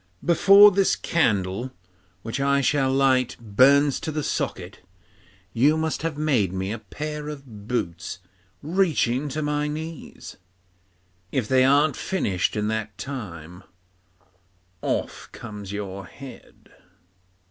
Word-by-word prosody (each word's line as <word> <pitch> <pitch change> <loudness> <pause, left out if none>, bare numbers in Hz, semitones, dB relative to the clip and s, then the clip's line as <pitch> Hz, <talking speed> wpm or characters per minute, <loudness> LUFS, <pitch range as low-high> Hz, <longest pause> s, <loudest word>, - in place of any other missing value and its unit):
Before 195 +4 +7
this 195 0 +2
candle, 110 - 0 0.5
which 115 +4 -4
I 140 0 +2
shall 135 -1 +2
light, 130 -2 +2
burns 135 +6 +4
to 160 - -4
the 150 0 -3
socket, 100 - -3 0.7
you 145 +7 +3
must 160 0 -2
have 160 -2 -3
made 130 - +1
me 95 +1 -3
a 115 - -4
pair 150 +7 -6
of 125 -9 -10
boots 90 -8 -3 0.5
reaching 150 -6 +1
to 150 +3 -3
my 150 0 -1
knees. 155 +1 -7 0.9
If 130 -6 -1
they 130 +1 +4
aren't 145 +3 +4
finished 100 - -1
in 105 0 -1
that 110 -2 -4
time, 95 - -7 1.2
off - - -3
comes 105 -2 -8
your 100 -2 -6
head. 135 -2 -14
135 Hz, 120 wpm, -24 LUFS, 105-150 Hz, 1.2 s, Before